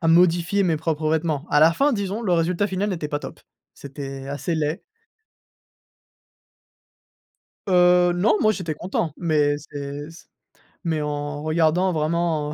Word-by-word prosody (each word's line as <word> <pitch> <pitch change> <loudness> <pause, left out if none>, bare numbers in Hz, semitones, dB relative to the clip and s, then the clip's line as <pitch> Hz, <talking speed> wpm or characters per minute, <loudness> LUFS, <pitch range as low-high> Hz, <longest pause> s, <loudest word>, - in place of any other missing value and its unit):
à 165 - +1
modifier 175 +3 +3
mes 170 -4 +1
propres 155 0 -2
vêtements. 160 -2 -1
À 145 - +4
la 160 +2 +6
fin, 280 +9 +2
disons, 200 0 -2
le 190 -6 0
résultat 175 +3 +1
final 200 +1 -2
n'était 165 -5 -3
pas 145 - -2
top. - - -9 0.3
C'était 135 -1 -8
assez 145 +4 -3
laid. 155 +1 -2 2.8
Heu, 180 -1 +4
non, 210 +5 +3
moi, 215 - +4
j'étais 170 -7 -4
content, 170 -1 -3
mais 150 -4 +1
c'est 145 0 -7
s 165 +1 -15 0.6
mais 160 -3 -1
en 145 0 -4
regardant 160 +3 +2
vraiment, 155 -1 -1
165 Hz, 145 wpm, -23 LUFS, 150-180 Hz, 2.8 s, la